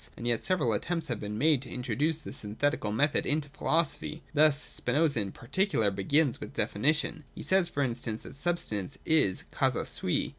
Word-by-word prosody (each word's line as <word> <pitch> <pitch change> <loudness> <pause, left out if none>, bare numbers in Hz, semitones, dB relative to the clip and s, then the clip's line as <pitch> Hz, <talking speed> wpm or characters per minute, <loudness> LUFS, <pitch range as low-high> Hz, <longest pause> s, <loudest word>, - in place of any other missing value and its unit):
And 120 - -7
yet 120 -2 +1
several 155 -12 +1
attempts 165 +10 -1
have 120 -4 -2
been 105 0 -5
made 145 +1 +3
to 135 - -8
introduce 130 +6 -1
the 160 - -9
syn 105 0 -7
thetical 145 -6 0
method 145 +7 +2
into 145 0 +1
philosophy. 155 +1 -1
Thus 150 -1 +5
Spinoza, 145 -1 +1
in 100 -1 -4
par 115 - -14
ticular, 140 - +1
begins 135 +8 +2
with - - -8
definitions. 155 +6 +1
He - - -7
says, 190 -2 +3
for 140 - -1
instance, 115 -3 -2
that - - -10
substance 135 - -1
is 150 - +3
the - - -23
causa - - +1
sui. - - -1
140 Hz, 190 wpm, -29 LUFS, 115-155 Hz, -, Thus